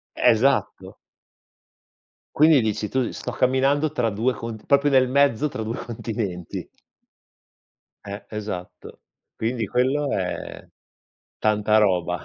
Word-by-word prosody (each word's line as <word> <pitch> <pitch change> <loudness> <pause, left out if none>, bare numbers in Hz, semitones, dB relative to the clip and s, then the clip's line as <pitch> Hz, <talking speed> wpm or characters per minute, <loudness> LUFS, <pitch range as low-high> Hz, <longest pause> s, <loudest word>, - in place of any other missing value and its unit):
Esatto. 130 +5 +1 1.4
Quindi, 155 -2 +6
dici 105 -1 -1
tu, 130 0 -1
sto - - -5
camminando 135 +4 +1
tra 120 -6 0
2 115 +5 0
cont 110 0 -7
proprio 140 +1 +3
nel 130 -2 +4
mezzo 140 +1 +2
tra 110 - -5
2 115 +2 -3
continenti. 105 -6 -5 1.4
Eh, 100 +1 -7
esatto. 105 -4 -7 0.3
Quindi 115 -1 -2
quello 135 +4 +1
è - - -4 0.7
tanta 105 0 +2
roba. 90 -4 +1
115 Hz, 110 wpm, -23 LUFS, 105-135 Hz, 1.4 s, Quindi